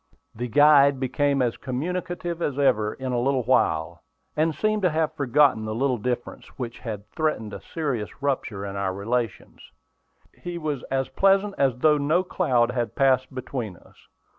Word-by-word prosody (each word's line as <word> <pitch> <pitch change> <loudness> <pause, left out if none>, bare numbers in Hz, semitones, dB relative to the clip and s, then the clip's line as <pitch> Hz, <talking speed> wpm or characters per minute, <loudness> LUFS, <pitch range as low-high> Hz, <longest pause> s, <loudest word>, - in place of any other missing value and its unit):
The 120 +2 -4
guide 140 +1 +5
became 140 +1 +1
as 120 -2 -1
communicative 175 +5 -4
as 145 -4 -1
ever 110 -7 +2
in 130 -1 -4
a 120 - 0
little 130 +1 +1
while, 85 -8 +1 0.3
and 155 0 +1
seemed 215 0 0
to 180 - +3
have 155 0 0
forgotten 140 -4 +3
the 110 0 -4
little 130 0 0
difference 120 +2 -4
which 120 -2 -5
had 105 -3 -6
threatened 155 -10 -2
a - - -7
serious 135 -10 -4
rupture 130 -8 -2
in 100 0 -6
our 95 -1 -2
relations. 115 +1 -3 0.7
He 175 -1 -7
was 150 -5 -3
as 135 0 0
pleasant 195 +1 +3
as 135 -3 +2
though 150 +3 +4
no 155 +6 +2
cloud 130 -10 +1
had 120 -3 -3
passed 130 -1 +2
between 120 -7 -5
us. - - -22
130 Hz, 165 wpm, -25 LUFS, 120-155 Hz, 0.7 s, guide